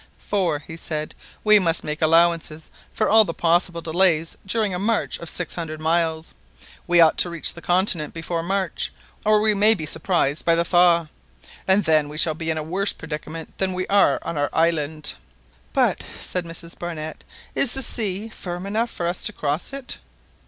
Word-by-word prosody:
"For," 190 Hz, -7 st, 0 dB
he 160 Hz, +2 st, -10 dB
said, 155 Hz, -2 st, -4 dB, 0.3 s
"we 215 Hz, -1 st, +6 dB
must 170 Hz, -3 st, 0 dB
make 150 Hz, +1 st, -4 dB
allowance 165 Hz, +1 st, +3 dB, 0.4 s
for 215 Hz, -, 0 dB
all 220 Hz, +1 st, +6 dB
the 165 Hz, -5 st, -5 dB
possible 170 Hz, 0 st, +1 dB
delays 165 Hz, -1 st, +2 dB
during 210 Hz, -1 st, 0 dB
a 180 Hz, -, -2 dB
march 220 Hz, +3 st, -1 dB
of 170 Hz, -, -5 dB
six 180 Hz, -, -2 dB
hundred 155 Hz, -2 st, -5 dB
miles. 160 Hz, 0 st, 0 dB, 0.5 s
We 175 Hz, 0 st, +4 dB
ought 160 Hz, -2 st, +5 dB
to 175 Hz, -, +5 dB
reach 170 Hz, -2 st, +2 dB
the 170 Hz, -, -11 dB
continent 175 Hz, -4 st, +2 dB
before 165 Hz, +1 st, -4 dB
March, 190 Hz, 0 st, -2 dB, 0.3 s
or 215 Hz, 0 st, +4 dB
we 215 Hz, 0 st, +3 dB
may 210 Hz, +2 st, +5 dB
be 160 Hz, -6 st, -5 dB
surprised 155 Hz, -2 st, 0 dB
by 170 Hz, -, +3 dB
the 170 Hz, 0 st, +1 dB
thaw, 170 Hz, -2 st, +3 dB, 0.6 s
and 190 Hz, +2 st, +4 dB
then 155 Hz, -3 st, +2 dB
we 150 Hz, -, -8 dB
shall 160 Hz, 0 st, +4 dB
be 160 Hz, +1 st, -5 dB
in 160 Hz, -, -1 dB
a 155 Hz, -, -3 dB
worse 190 Hz, +6 st, 0 dB
predicament 160 Hz, +1 st, -8 dB
than 190 Hz, -1 st, +1 dB
we 185 Hz, 0 st, -2 dB
are 200 Hz, -9 st, +4 dB
on 165 Hz, -, -4 dB
our 145 Hz, -, 0 dB
island." 155 Hz, -2 st, +1 dB, 0.6 s
"But," -, -, +2 dB
said 180 Hz, -1 st, -4 dB
Mrs 165 Hz, 0 st, -6 dB
Barnett, 160 Hz, -3 st, -6 dB, 0.3 s
"is 275 Hz, -2 st, +3 dB
the 270 Hz, -, +1 dB
sea 210 Hz, -3 st, -1 dB
firm 180 Hz, -4 st, -6 dB
enough 220 Hz, +4 st, -1 dB
for 175 Hz, -, -5 dB
us 175 Hz, +1 st, -2 dB
to 210 Hz, -, +1 dB
cross 150 Hz, -, -2 dB
it?" 275 Hz, -2 st, -3 dB
170 Hz, 190 wpm, -22 LUFS, 160-190 Hz, 0.6 s, we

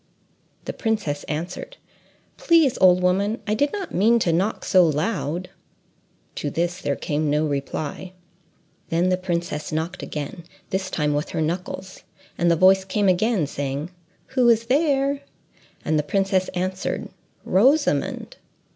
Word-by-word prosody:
The -, -, -4 dB
princess 210 Hz, -11 st, -2 dB
answered, 175 Hz, -, -5 dB, 0.6 s
"Please, 320 Hz, -6 st, +3 dB
old 180 Hz, -1 st, +5 dB
woman, 200 Hz, +5 st, +1 dB
I 210 Hz, -, 0 dB
did 285 Hz, +6 st, +1 dB
not 395 Hz, -3 st, -5 dB
mean 225 Hz, +6 st, +4 dB
to 175 Hz, -7 st, +1 dB
knock 195 Hz, +6 st, 0 dB
so 185 Hz, -2 st, +5 dB
loud." 170 Hz, +2 st, -1 dB, 0.9 s
To 145 Hz, -, -2 dB
this 175 Hz, +4 st, -2 dB
there 140 Hz, -, -1 dB
came 150 Hz, +1 st, -1 dB
no 150 Hz, +2 st, +2 dB
reply. 145 Hz, +5 st, -4 dB, 0.8 s
Then 170 Hz, +2 st, +2 dB
the 185 Hz, -, +3 dB
princess 170 Hz, -4 st, -3 dB
knocked 160 Hz, +4 st, -3 dB
again, 150 Hz, +3 st, -6 dB, 0.3 s
this 190 Hz, 0 st, -1 dB
time 150 Hz, -4 st, 0 dB
with 145 Hz, +2 st, -2 dB
her 160 Hz, -, -2 dB
knuckles, 180 Hz, +3 st, -4 dB, 0.3 s
and 175 Hz, -, +2 dB
the 170 Hz, -, +4 dB
voice 190 Hz, +3 st, +5 dB
came 200 Hz, +1 st, 0 dB
again, 190 Hz, -1 st, +2 dB
saying, 140 Hz, +3 st, -4 dB, 0.4 s
"Who 255 Hz, -2 st, +3 dB
is 230 Hz, 0 st, +3 dB
there?" 275 Hz, +1 st, +1 dB, 0.6 s
And 155 Hz, -1 st, +2 dB
the -, -, +3 dB
princess 190 Hz, +4 st, +1 dB
answered, 185 Hz, +1 st, -2 dB, 0.4 s
"Rosamond." 255 Hz, -, +2 dB
185 Hz, 140 wpm, -23 LUFS, 155-215 Hz, 0.9 s, old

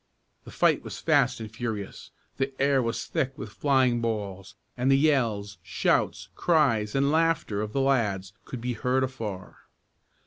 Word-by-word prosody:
The -, -, -10 dB
fight -, -, +2 dB
was -, -, -7 dB
fast -, -, +2 dB
and 110 Hz, -1 st, -8 dB
furious. 110 Hz, -4 st, -5 dB, 0.3 s
The 135 Hz, 0 st, -2 dB
air 140 Hz, -1 st, +3 dB
was 115 Hz, -1 st, -2 dB
thick 135 Hz, -4 st, -2 dB
with -, -, -7 dB
flying 130 Hz, -4 st, +2 dB
balls; 100 Hz, -4 st, -4 dB, 0.2 s
and 125 Hz, +2 st, 0 dB
the 135 Hz, -, +6 dB
yells, 115 Hz, -, +1 dB
shouts, 90 Hz, 0 st, 0 dB
cries, 115 Hz, -, +2 dB
and 140 Hz, +1 st, +2 dB
laughter 160 Hz, -10 st, +1 dB
of 105 Hz, 0 st, -4 dB
the 135 Hz, -, 0 dB
lads 105 Hz, -8 st, +1 dB
could 125 Hz, -, -7 dB
be 125 Hz, +1 st, -2 dB
heard 125 Hz, +3 st, 0 dB
afar. 110 Hz, -8 st, -5 dB
120 Hz, 160 wpm, -27 LUFS, 105-135 Hz, 0.3 s, the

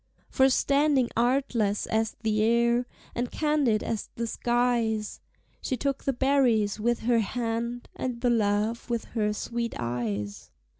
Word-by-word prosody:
For 265 Hz, -1 st, +4 dB
standing 275 Hz, -1 st, +2 dB
artless 235 Hz, -4 st, +1 dB
as 220 Hz, 0 st, -1 dB
the 215 Hz, -1 st, +1 dB
air, 235 Hz, +2 st, +2 dB, 0.3 s
And 240 Hz, 0 st, -2 dB
candid 295 Hz, -8 st, +1 dB
as 220 Hz, -, -3 dB
the 235 Hz, -, -2 dB
skies, 235 Hz, -2 st, 0 dB, 0.4 s
She 255 Hz, -, -2 dB
took 275 Hz, +2 st, -2 dB
the 275 Hz, -, +2 dB
berries 245 Hz, -6 st, +2 dB
with 240 Hz, +2 st, 0 dB
her 235 Hz, 0 st, +3 dB
hand, 235 Hz, +2 st, -2 dB
And 250 Hz, -2 st, -3 dB
the 245 Hz, -, +3 dB
love 215 Hz, +1 st, 0 dB
with 235 Hz, -1 st, -1 dB
her 210 Hz, -3 st, +1 dB
sweet 235 Hz, +2 st, -3 dB
eyes. 105 Hz, -4 st, -3 dB
235 Hz, 140 wpm, -27 LUFS, 215-250 Hz, 0.4 s, For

